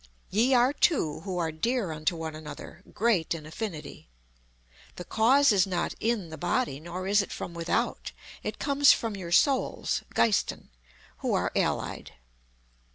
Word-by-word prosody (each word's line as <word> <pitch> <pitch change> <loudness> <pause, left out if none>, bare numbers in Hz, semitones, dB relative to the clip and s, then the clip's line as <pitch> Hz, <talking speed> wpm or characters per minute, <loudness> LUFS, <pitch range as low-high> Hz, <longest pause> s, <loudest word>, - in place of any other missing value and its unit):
Ye 240 +6 +3
are 250 +3 +4
two 255 - +1
who 185 +2 -5
are 165 -2 -1
dear 215 +4 -1
unto 155 +2 -1
one 160 -1 -5
another; 150 -2 -9
great 200 -8 +1
in 155 -2 -8
affinity. 160 - -7 0.9
The 180 - -8
cause 260 +5 +4
is 195 -2 +3
not 180 -2 -1
in 220 -6 -1
the 160 - -9
body, 175 - 0
nor 175 +3 -6
is 205 +2 +4
it - - -7
from 175 - -6
without; 170 0 -2 0.3
it - - -4
comes 280 0 +5
from 225 -3 -3
your 180 -3 -7
souls 270 +8 +2
(Geisten), 215 -4 +1 0.5
who - - 0
are - - 0
allied. - - -2
190 Hz, 155 wpm, -28 LUFS, 165-235 Hz, 0.9 s, comes